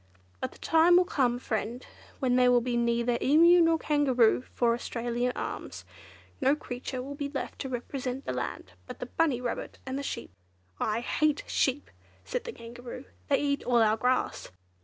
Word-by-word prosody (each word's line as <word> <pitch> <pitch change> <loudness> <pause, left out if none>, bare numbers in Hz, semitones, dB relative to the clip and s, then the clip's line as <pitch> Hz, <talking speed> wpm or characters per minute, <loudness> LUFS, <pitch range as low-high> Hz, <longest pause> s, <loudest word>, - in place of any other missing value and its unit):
But - - -3
the - - -16
time 335 +2 +5
will 360 - +5
come, 250 -8 +1
friend, 235 +1 -3 0.3
when 255 -3 +1
there 250 0 +5
will 245 - +5
be 240 0 -2
neither 235 0 +1
Emu 335 +5 +6
nor 330 -1 +4
Kangaroo 265 -8 +3
for 235 -1 +3
Australia's 240 +1 -2
Arms; - - -6 0.6
no 270 +2 +4
creature 250 -2 -5
will 280 +2 -6
be 285 0 -4
left 280 -1 -5
to 270 - -4
represent 255 +1 -4
the - - -2
land 120 -7 -5
but - - -8
the - - -5
Bunny 285 -1 +1
Rabbit 245 -1 -4
and 260 +1 -3
the - - -3
Sheep." 280 - -5 0.5
"I 220 +2 0
hate 300 +4 +1
sheep!" 275 +2 0 0.3
said - - -3
the 470 - -4
Kangaroo, 245 - -9 0.2
"they 280 - +3
eat 285 -1 0
all 240 -2 +4
our 215 0 +3
grass." 250 +3 0
250 Hz, 180 wpm, -29 LUFS, 240-285 Hz, 0.6 s, Emu